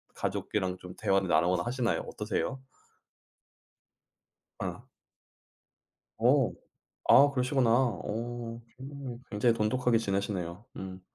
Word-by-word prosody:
가족이랑 95 -3 -2
좀 90 0 -10
대화를 95 -1 +2
나누거나 85 +2 +3
하시나요? 125 -1 0
어떠세요? 110 +5 -2 2.0
어. - - -5 1.3
어. - - +4 0.6
아 140 +1 +8
그러시구나. 125 -2 +2
어 115 0 -1 0.2
충분히 135 -2 -7
굉장히 115 +2 +3
돈독하게 120 +2 +2
지내시네요. 100 -2 -2
음. 95 0 -7
115 Hz, 240 characters per minute, -30 LUFS, 95-125 Hz, 2.0 s, 아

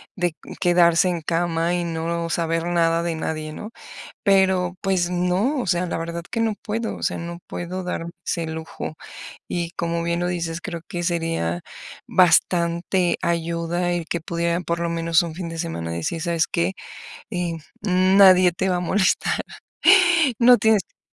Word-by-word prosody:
de 175 -3 0 0.3
quedarse 175 0 +4
en 175 -1 -1
cama 165 +1 0
y 175 - -1
no 170 0 -2
saber 165 0 0
nada 170 -1 +2
de 170 -1 -2
nadie, 155 -1 -4
¿no?, 210 +8 -8 0.5
pero 190 -2 +3
pues 185 -3 0
no, 180 +10 +1
o - - -3
sea, 175 +1 +1
la - - -3
verdad, 170 +1 -4
que 230 - -3
no 225 -1 +1
puedo, 225 +1 -3
o - - -11
sea, - - -1
no 170 0 -6
puedo 180 +2 -5
darme 170 -1 -4 0.2
ese 170 -2 -1
lujo. 160 0 -6 0.5
Y 170 -1 -3
como 170 -1 -2
bien 170 0 -1
lo 175 - 0
dices, 170 -2 -3
creo 170 -4 -6
que 175 - -4
sería 165 - -1 0.5
bastante 175 0 +2
ayuda 170 +1 -1
y 170 -2 -3
que 170 +1 -3
pudiera 170 +1 -1
por 170 -1 -2
lo 170 0 -1
menos 165 -1 +2
un 165 - -5
fin 175 -2 -5
de 165 - -7
semana 160 - -4
decir: 85 - -3
"¿Sabes 170 -1 +1
qué? 170 +3 0 0.6
Eh, 180 -4 -2 0.3
mm, 185 0 +3
nadie 185 -2 +7
te 180 +3 -2
va 180 - +1
a - - -1
molestar, 190 +2 +1 1.0
no 245 0 +7
tienes 220 -2 +3
que - - -44
dar - - -75
170 Hz, 175 wpm, -22 LUFS, 165-180 Hz, 1.0 s, nadie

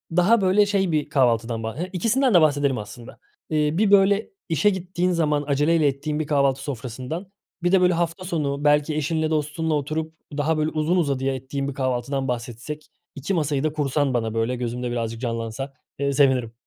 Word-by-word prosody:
daha 200 +6 +4
böyle 195 +2 +4
şey 195 -3 +1
bir 150 -1 0
kahvaltıdan 115 -5 +1
bah 110 +3 -5 0.2
ikisinden 230 +7 +2
de 175 - +7
bahsedelim 145 -3 +2
aslında. 115 +3 -9 0.3
Eee, 150 -2 +1
bir, 205 0 +3
böyle, 200 +1 +4 0.2
işe 165 +5 +3
gittiğin 185 -1 -1
zaman 150 -4 +1
aceleyle 150 +2 +3
ettiğin 150 +2 -2
bir 155 - -2
kahvaltı 140 -2 +2
sofrasından, 135 - -6 0.3
bir 175 - +2
de, 190 -1 +5
böyle, 180 0 +4
hafta 170 +1 -2
sonu 145 -5 -2
belki 150 +1 +3
eşinle 155 +1 0
dostunla 155 +1 -1
oturup 155 +2 -2 0.2
daha, 155 +2 +1
böyle, 155 0 +1
uzun 160 +3 0
uzadıya 135 -5 0
ettiğin 135 +2 -4
bir 140 - -4
kahvaltıdan 130 +1 -1
bahsetsek, 125 +5 -5 0.3
2 145 +7 -3
masayı 150 -5 0
da 155 -1 0
kursan 145 -2 0
bana 115 -2 -1
böyle, 115 +2 0
gözümde 125 0 -3
birazcık 115 -1 -3
canlansa, 115 +2 -4 0.3
ııı, 140 0 +1
sevinirim. 130 -5 +2
150 Hz, 175 wpm, -23 LUFS, 130-165 Hz, 0.3 s, de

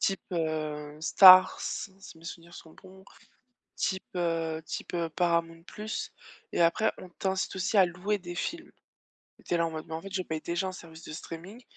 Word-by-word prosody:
type, 195 - +1
heu, 155 -3 -3
Stars, 185 +3 +8
si 195 - -4 0.2
mes 165 - -18
souvenirs 170 0 -9
sont 160 - -12
bons 190 +1 -16 0.7
type, 190 -2 -1
heu 165 -2 -1
type, - - -6
heu, 170 -1 -1
Paramount 170 0 0 0.4
+ - - -22
et - - +1
après 170 +6 +3
on 185 - -10
t'incite 190 +2 -2
aussi 190 +3 -1
à 190 - +8
louer 180 +4 -2
des 175 -1 -8
films, 330 - -4 0.8
tu - - -1
es 170 - +2
là, 170 - +2
en - - -3
mode: 160 +1 -6
«Mais 160 - -5
en 160 - -5
fait, 195 - -9
je 185 - -1
paye 160 -3 -4
déjà 170 +4 -2
un - - -5
service 165 -3 -12
de - - -8
streaming, 180 +10 -9
170 Hz, 195 wpm, -29 LUFS, 165-190 Hz, 0.8 s, Stars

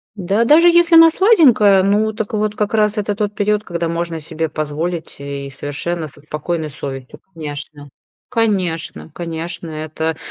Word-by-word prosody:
Да 200 +3 0
даже 310 +8 +6
если 345 0 +5
она 330 0 +9
сладенькая, 270 - +5
ну 210 +3 +2
так 220 -1 -5
вот 215 0 -1
как 210 0 -2
раз 210 -1 +2
это 205 0 -1
тот 210 0 -2
период, 210 0 0
когда 170 -3 -3
можно 170 0 -3
себе 160 +1 -4
позволить 160 +3 -4
и 140 -1 -6
совершенно 155 +4 -4
со 145 - -15
спокойной 155 +2 -4
совестью. 135 -2 -8
Конечно, 145 -2 -7 0.4
конечно, 185 -10 -1
конечно. 170 0 -5
Это, 155 +1 -4
175 Hz, 150 wpm, -18 LUFS, 155-210 Hz, 0.4 s, она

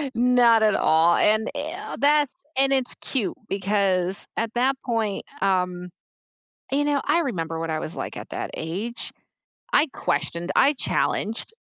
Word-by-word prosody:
Not 240 -2 +5
at 215 -1 +4
all, 165 +2 +4
and, 215 +1 +2
eh, 315 +8 -5
that's 290 0 +3 0.2
and 270 0 +3
it's 260 -2 0
cute, 240 -8 -3
because 195 -2 0
at 225 0 -1
that 255 +3 +2
point, 225 -5 -1 0.2
um 180 -2 0 0.8
You 285 +2 +2
know, 290 -1 +1
I 340 - +3
remember 165 - -3
what 165 0 -3
I 155 0 -1
was 155 - -6
like - - -5
at - - -8
that - - -5
age. 195 +9 -5 0.6
I 305 - +5
questioned, 175 0 -2
I 285 - +5
challenged. 225 - -1
220 Hz, 150 wpm, -24 LUFS, 180-265 Hz, 0.8 s, Not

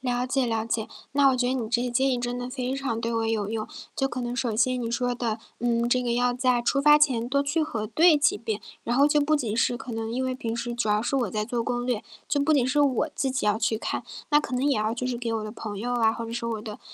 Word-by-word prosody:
了 250 -1 -1
解 265 0 +1
了 225 -1 -1
解， 225 -1 -2 0.2
那 280 0 +5
我 260 - +2
觉 245 -1 +1
得 250 - +1
你 240 -4 -2
这 240 +1 +1
些 250 - -1
建 265 +3 +2
议 250 - 0
真 245 0 -3
的 245 0 -5
非 255 0 -2
常 265 -5 -2
对 230 0 -2
我 225 0 0
有 215 -3 -1
用。 220 0 -3 0.3
就 270 - 0
可 255 0 -4
能 240 0 -3
首 245 -3 -1
先 255 +2 +2
你 230 - -3
说 245 +1 0
的， 235 -2 -2 0.2
嗯， 235 0 +1
这 250 +1 +2
个 240 -1 0
要 245 0 +2
在 250 -1 +2
出 275 +4 +1
发 295 +1 +7
前 250 -6 +2
多 280 +2 +2
去 290 +3 0
核 225 -8 -3
对 325 +7 +5
几 295 -4 +3
遍， 215 -1 -3 0.2
然 240 - -1
后 280 +2 +6
就 295 0 +3
不 305 +1 +3
仅 225 -6 -2
是 240 +1 +2
可 250 -1 -8
能 225 0 -3
因 255 +3 -1
为 260 0 -1
平 230 -3 -4
时 240 0 -3
主 235 -2 -1
要 210 0 +3
是 240 - -2
我 245 -7 +1
在 210 +1 -1
做 240 0 -2
攻 245 +1 -2
略， 240 -4 -1 0.3
就 285 - +1
不 310 +2 +3
仅 265 -4 +3
是 290 +3 +2
我 285 +1 +2
自 270 - 0
己 260 -4 -1
要 210 0 +3
去 220 0 0
看， - - -3 0.3
那 295 0 +5
可 275 - -5
能 270 +3 +1
也 280 - +2
要 215 +1 0
就 250 +2 -3
是 250 -1 -2
给 235 -1 -3
我 220 -1 -2
的 215 - -6
朋 210 -3 -6
友 245 +4 -2
啊， 225 -2 +3
或 230 0 -5
者 225 - -7
说 235 0 -3
我 220 -2 -3
的 210 -1 -8
245 Hz, 320 characters per minute, -26 LUFS, 230-265 Hz, 0.3 s, 发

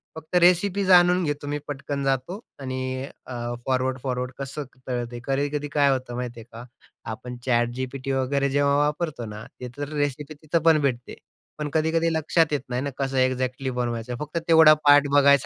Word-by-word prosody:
फक्त 160 +3 -7
रेसिपी 180 +3 +4
जाणून 180 0 +5
घेतो, 145 -1 -3
मी 145 +1 -1
पटकन 140 0 -4
जातो 135 - -1 0.2
आणि 130 0 -3 0.2
अ, 125 - -7 0.3
फॉरवर्ड-फॉरवर्ड 130 -1 -1
कसं 140 +2 -5 0.2
कळतंय, 120 -1 -3
कधी-कधी 145 +2 -1
काय 145 -2 +4
होतं 130 -2 -3
माहिती 120 -1 -5
आहे 110 - -11
का? 115 +2 -9 0.5
आपण 125 +2 -7
ChatGPT 130 +3 -1
वगैरे 135 +1 0
जेव्हा 140 +1 +2
वापरतो 150 -3 -1
ना, 105 0 -8
तिथं 125 +3 -6
रेसिपी 145 0 -2
तिथं 155 +3 -1
पण 160 -2 +5
भेटते. 125 -3 -2 0.4
पण 150 -1 -3
कधी-कधी 160 +1 +2
लक्षात 160 0 +2
येत 145 - 0
नाही 125 +1 -1
ना, 140 - -2
कसं 135 -1 -2
एक्झॅक्टली 130 +1 0
बनवायचं, 120 0 -3
फक्त 150 +2 -5
तेवढा 160 -2 +8
पार्ट 145 0 +7
बघायसाठी 140 -1 +5
140 Hz, 165 wpm, -24 LUFS, 125-150 Hz, 0.5 s, तेवढा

